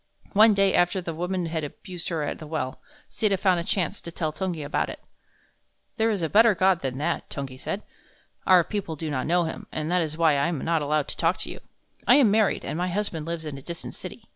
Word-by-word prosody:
One 215 Hz, +1 st, +7 dB
day 195 Hz, -1 st, +3 dB
after 175 Hz, +2 st, +3 dB
the 170 Hz, -2 st, -4 dB
woman 180 Hz, +2 st, -2 dB
had 160 Hz, -1 st, -2 dB
abused 175 Hz, +4 st, -6 dB
her 165 Hz, -3 st, -1 dB
at 145 Hz, -, -3 dB
the 155 Hz, -, -8 dB
well, 150 Hz, -4 st, -3 dB, 0.3 s
Sita 205 Hz, -3 st, +1 dB
found 185 Hz, -2 st, +3 dB
a -, -, -2 dB
chance 180 Hz, -1 st, -1 dB
to 170 Hz, -, -8 dB
tell 155 Hz, -2 st, -2 dB
Tungi 175 Hz, -3 st, -3 dB
about 145 Hz, -, -1 dB
it. -, -, -7 dB, 1.0 s
"There 225 Hz, +1 st, +3 dB
is 200 Hz, -6 st, -1 dB
a -, -, +2 dB
better 215 Hz, +4 st, +5 dB
God 185 Hz, -1 st, +3 dB
than 130 Hz, -1 st, -3 dB
that," 165 Hz, +4 st, -2 dB
Tungi 135 Hz, -2 st, -6 dB
said. 205 Hz, +8 st, -4 dB, 0.6 s
"Our 185 Hz, -2 st, +7 dB
people 200 Hz, -4 st, -4 dB
do 155 Hz, 0 st, -4 dB
not 130 Hz, -3 st, -1 dB
know 175 Hz, +2 st, +3 dB
him, 160 Hz, -, -5 dB
and 155 Hz, +2 st, -3 dB
that 180 Hz, 0 st, +3 dB
is 155 Hz, -1 st, -3 dB
why 160 Hz, -3 st, +4 dB
I 140 Hz, -, +2 dB
am 170 Hz, -2 st, -1 dB
not 165 Hz, -1 st, +2 dB
allowed 150 Hz, 0 st, 0 dB
to -, -, -5 dB
talk 165 Hz, +2 st, +2 dB
with -, -, -3 dB
you. -, -, -7 dB, 0.5 s
I -, -, +8 dB
am 260 Hz, -8 st, +5 dB
married, 215 Hz, -1 st, +2 dB
and 160 Hz, -, -3 dB
my 180 Hz, -, 0 dB
husband 175 Hz, -4 st, -2 dB
lives 165 Hz, -1 st, -4 dB
in 145 Hz, -3 st, -5 dB
a -, -, -13 dB
distant 170 Hz, +4 st, -6 dB
city. -, -, -8 dB
170 Hz, 240 wpm, -26 LUFS, 155-190 Hz, 1.0 s, I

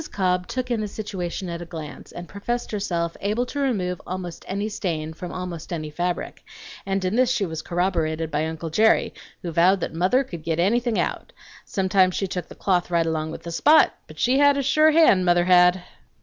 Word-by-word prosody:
Cobb 180 Hz, -2 st, 0 dB
took 255 Hz, -1 st, -3 dB
in 230 Hz, -2 st, 0 dB
the 210 Hz, -, -2 dB
situation 190 Hz, -3 st, -5 dB
at 170 Hz, 0 st, -5 dB
a -, -, -6 dB
glance, 160 Hz, -3 st, -9 dB
and 175 Hz, 0 st, -8 dB
professed 240 Hz, +6 st, -4 dB
herself 170 Hz, -5 st, -2 dB
able 215 Hz, +5 st, 0 dB
to 285 Hz, -, -5 dB
remove 195 Hz, -10 st, -1 dB
almost 180 Hz, -2 st, -6 dB
any 200 Hz, +2 st, -2 dB
stain 160 Hz, -7 st, -3 dB
from 175 Hz, +2 st, -7 dB
almost 180 Hz, -3 st, -6 dB
any 155 Hz, -3 st, -4 dB
fabric; 175 Hz, +3 st, -3 dB, 0.4 s
and 195 Hz, -1 st, -1 dB
in 185 Hz, +4 st, 0 dB
this 255 Hz, 0 st, +3 dB
she 240 Hz, -6 st, +1 dB
was 160 Hz, -2 st, -5 dB
corroborated 165 Hz, -3 st, -1 dB
by 150 Hz, +2 st, 0 dB
uncle 160 Hz, 0 st, -5 dB
Jerry, 220 Hz, +7 st, +3 dB, 0.3 s
who 170 Hz, -, -3 dB
vowed 180 Hz, +4 st, +4 dB
that -, -, -3 dB
mother 185 Hz, +11 st, +2 dB
could 170 Hz, -11 st, -8 dB
git 160 Hz, +1 st, -2 dB
anything 230 Hz, +5 st, +1 dB
out. -, -, -2 dB, 0.3 s
Sometimes 190 Hz, -1 st, +2 dB
she 195 Hz, -, -1 dB
took 180 Hz, -1 st, -4 dB
the -, -, -12 dB
cloth 180 Hz, -3 st, 0 dB
right 170 Hz, -1 st, +2 dB
along 160 Hz, -1 st, -2 dB
with -, -, -8 dB
the 170 Hz, -, -6 dB
spot, 305 Hz, -, +5 dB
but -, -, -13 dB
she 255 Hz, +3 st, +2 dB
had 285 Hz, 0 st, +5 dB
a 280 Hz, -, 0 dB
sure 305 Hz, +4 st, +4 dB
hand, 310 Hz, -, +5 dB
mother 175 Hz, -1 st, +3 dB
had! 180 Hz, 0 st, +5 dB
180 Hz, 205 wpm, -23 LUFS, 170-215 Hz, 0.4 s, spot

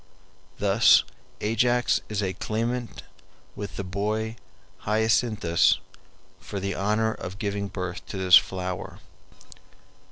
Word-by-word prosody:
Thus 105 Hz, +3 st, +5 dB, 0.4 s
Ajax 120 Hz, +3 st, +2 dB
is 105 Hz, -1 st, -1 dB
a 95 Hz, -1 st, -1 dB
claimant 115 Hz, +4 st, -3 dB, 0.5 s
with 100 Hz, 0 st, -6 dB
the 100 Hz, -, -4 dB
boy 105 Hz, +4 st, -2 dB, 0.4 s
Hyacinthus 110 Hz, -4 st, +2 dB, 0.6 s
for 100 Hz, -, -6 dB
the 100 Hz, 0 st, -2 dB
honor 110 Hz, +2 st, 0 dB
of 90 Hz, +2 st, -8 dB
giving 100 Hz, -2 st, -2 dB
birth 90 Hz, -2 st, -5 dB
to 100 Hz, -, -6 dB
this 95 Hz, -1 st, +6 dB
flower. 90 Hz, -1 st, +1 dB
105 Hz, 105 wpm, -26 LUFS, 95-110 Hz, 0.6 s, this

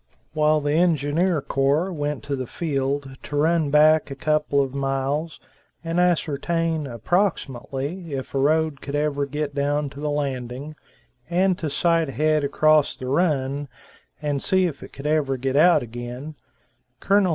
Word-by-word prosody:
While 155 Hz, 0 st, +3 dB
the 145 Hz, 0 st, -1 dB
engineer 165 Hz, 0 st, +2 dB
corps 145 Hz, +7 st, +1 dB
went 145 Hz, -5 st, -3 dB
to 140 Hz, -, -2 dB
the 130 Hz, -2 st, -4 dB
field, 140 Hz, -3 st, -2 dB
to 145 Hz, -, -7 dB
run 160 Hz, +1 st, +2 dB
back 155 Hz, +1 st, +5 dB
a 135 Hz, -, -5 dB
couple 150 Hz, 0 st, +1 dB
of 135 Hz, -2 st, 0 dB
miles 140 Hz, +3 st, -2 dB, 0.4 s
and 165 Hz, +1 st, -1 dB
ascertain, 165 Hz, -2 st, 0 dB
approximately, 145 Hz, -, -2 dB
if 130 Hz, -, -6 dB
a 135 Hz, -, 0 dB
road 155 Hz, +1 st, +1 dB
could 140 Hz, -, -5 dB
ever 145 Hz, -1 st, 0 dB
get 145 Hz, +1 st, -3 dB
down 145 Hz, 0 st, 0 dB
to 140 Hz, -, -11 dB
the 150 Hz, 0 st, -2 dB
Landing, 140 Hz, 0 st, -3 dB, 0.5 s
and 185 Hz, +2 st, +2 dB
to 155 Hz, -, -2 dB
sight 165 Hz, +1 st, +1 dB
ahead 155 Hz, +3 st, +1 dB
across 155 Hz, +1 st, +3 dB
the 130 Hz, -, -7 dB
Run, 140 Hz, -1 st, 0 dB, 0.5 s
and 145 Hz, -2 st, -2 dB
see 190 Hz, -1 st, +2 dB
if 155 Hz, -5 st, -4 dB
it -, -, -10 dB
could 140 Hz, -, -10 dB
ever 150 Hz, -3 st, +1 dB
get 130 Hz, +1 st, -2 dB
out 170 Hz, -1 st, +5 dB
again, 120 Hz, +5 st, -7 dB, 0.7 s
Col. 200 Hz, -1 st, +3 dB
145 Hz, 155 wpm, -23 LUFS, 140-160 Hz, 0.7 s, back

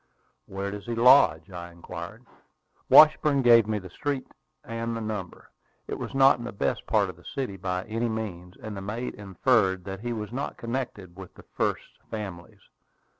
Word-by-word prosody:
"Where 100 Hz, +1 st, -4 dB
does 105 Hz, +2 st, -8 dB
he 120 Hz, -, -2 dB
lodge?" 115 Hz, -, +5 dB
I 85 Hz, -1 st, -8 dB
inquired. 85 Hz, +7 st, -9 dB, 0.6 s
Washburn 150 Hz, -2 st, +7 dB
gave 115 Hz, -3 st, +6 dB
me 110 Hz, -1 st, 0 dB
the 90 Hz, -3 st, -9 dB
street 140 Hz, +5 st, -3 dB, 0.4 s
and 115 Hz, 0 st, -4 dB
number. 100 Hz, -5 st, -6 dB, 0.4 s
It -, -, -5 dB
was -, -, -6 dB
not 135 Hz, -1 st, +6 dB
in -, -, -6 dB
the 120 Hz, -, -5 dB
best 100 Hz, -, -2 dB
part -, -, +2 dB
of -, -, -21 dB
the -, -, -18 dB
city 130 Hz, -8 st, -3 dB
by 90 Hz, -1 st, -3 dB
any 115 Hz, +2 st, -2 dB
means; 95 Hz, -5 st, -5 dB
and 110 Hz, -1 st, -7 dB
the 95 Hz, -, -6 dB
mate 110 Hz, +6 st, -4 dB
inferred 95 Hz, -1 st, +1 dB
that 95 Hz, +1 st, -6 dB
he 120 Hz, +3 st, -4 dB
was 110 Hz, -2 st, -4 dB
not 135 Hz, +4 st, -4 dB
connected 115 Hz, -7 st, -5 dB
with 95 Hz, -1 st, -11 dB
the -, -, -14 dB
"first -, -, -3 dB
families." 95 Hz, -6 st, -7 dB
105 Hz, 175 wpm, -27 LUFS, 95-120 Hz, 0.6 s, Washburn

